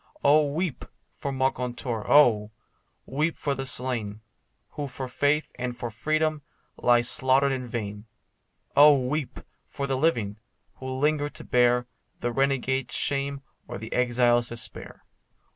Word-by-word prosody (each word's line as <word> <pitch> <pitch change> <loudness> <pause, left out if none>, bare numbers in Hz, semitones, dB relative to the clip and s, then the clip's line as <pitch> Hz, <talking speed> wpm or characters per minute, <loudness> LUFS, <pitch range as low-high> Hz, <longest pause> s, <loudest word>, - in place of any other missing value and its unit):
Oh, 145 0 +4
weep 165 -1 -2 0.3
for 140 - -4
Moncontour! 125 -4 -2
Oh! 115 -8 +5 0.6
weep 155 +5 -1
for 145 -2 -1
the 135 0 -4
slain, 120 -5 -2 0.5
Who 145 -1 -4
for 130 0 -6
faith 145 +4 0
and 125 -1 -3
for 120 - -5
freedom 155 +6 0 0.4
lay 120 -1 +4
slaughtered 130 +3 +3
in 130 -2 -3
vain; 105 -2 -5 0.7
Oh, 145 0 +8
weep 135 +2 -3 0.3
for 140 - -4
the 135 -1 -1
living, 115 -9 0 0.4
who 130 - -7
linger 145 +3 0
to - - -8
bear 125 0 +3 0.3
The 120 - -2
renegade's 135 0 0
shame, 140 0 0 0.3
or - - -6
the 110 +2 -7
exile's 120 -1 +2
despair. 120 -1 -8
130 Hz, 135 wpm, -26 LUFS, 120-140 Hz, 0.7 s, Oh